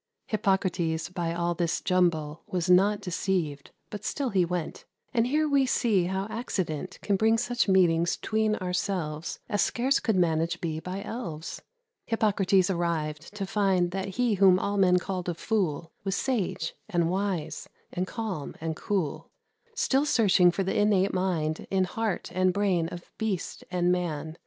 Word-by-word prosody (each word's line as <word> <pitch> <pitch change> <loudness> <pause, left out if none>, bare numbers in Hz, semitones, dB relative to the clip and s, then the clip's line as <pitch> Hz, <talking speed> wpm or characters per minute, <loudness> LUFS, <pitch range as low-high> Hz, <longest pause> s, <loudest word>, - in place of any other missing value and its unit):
Hippocrates, 180 -6 0
by 175 -2 -2
all 170 0 0
this 170 -1 0
jumble, 170 -4 +1
Was 180 -1 0
not 200 +3 +4
deceived, 175 -6 -2 0.2
but 210 - -6
still 275 -3 -1
he 190 -4 +3
went; 175 -2 -3 0.3
And 235 -1 +2
here 305 +4 +2
we 280 -2 +3
see 215 -8 +2
how 190 +2 -1
accident 185 - -3
Can 200 -2 +2
bring 220 +2 +3
such 245 0 0
meetings 175 -3 +3
'tween 215 0 0
ourselves 180 -4 -2
As 205 - +1
scarce 260 +3 +2
could 220 - 0
managed 170 -1 +1
be 160 -2 -3
by 185 +4 -5
elves. 170 -9 -6 0.5
Hippocrates 200 -4 +2
arrived, 165 -1 -2
to 200 -2 -3
find 190 -3 +1
That 190 0 -4
he 245 -2 +2
whom 190 -2 +6
all 200 +2 -1
men 180 -2 +5
called 180 -1 -3
a 175 - -2
fool 170 -6 -1
Was 195 -1 -1
sage, 200 -11 -1 0.2
and 170 -2 +1
wise, 185 -2 -2 0.2
and 180 +1 -1
calm, 210 - -4
and 160 0 -3
cool, 165 -6 -2 0.5
Still 280 - +2
searching 195 -9 +5
for 175 +3 0
the 190 - -2
innate 200 -2 +3
mind 170 -4 -1
In 190 -1 +2
heart 210 +1 -2
and 185 0 +3
brain 190 -4 +1
of 175 0 -9
beast 215 -5 -3
and 180 -1 +1
man. 160 -3 -2
185 Hz, 160 wpm, -27 LUFS, 170-205 Hz, 0.5 s, whom